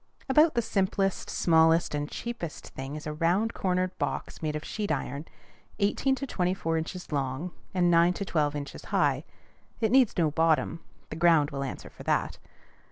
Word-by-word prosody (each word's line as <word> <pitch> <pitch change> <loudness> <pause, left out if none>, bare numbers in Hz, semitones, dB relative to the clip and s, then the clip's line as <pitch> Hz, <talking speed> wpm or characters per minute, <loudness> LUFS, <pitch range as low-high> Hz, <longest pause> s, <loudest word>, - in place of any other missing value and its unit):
About 300 +2 +5
the 235 - +2
simplest, 195 -1 0
smallest, 165 0 +3
and 145 0 -2
cheapest 235 -10 -6
thing 135 +2 -6
is 155 - -7
a 150 - -3
round 175 +8 +1
cornered 185 -1 0
box - - -3
made 155 -1 -2
of 150 - -4
sheet 210 -4 -3
iron, 140 +1 -3 0.5
eighteen 225 +6 +2
to 275 - -4
twenty 185 -7 0
four 165 -3 -1
inches 170 +3 -4
long 140 +4 -2 0.2
and 175 -2 +2
nine 170 +1 +5
to 200 - -4
twelve 150 -4 0
inches 140 -1 -6
high. - - +1 0.6
It 220 -2 +1
needs 255 -3 +4
no 160 -4 +2
bottom: 165 +1 +2 0.3
the - - -4
ground 160 -3 +4
will 140 -1 -3
answer 135 - -6
for - - -14
that. - - 0
170 Hz, 175 wpm, -28 LUFS, 150-195 Hz, 0.6 s, About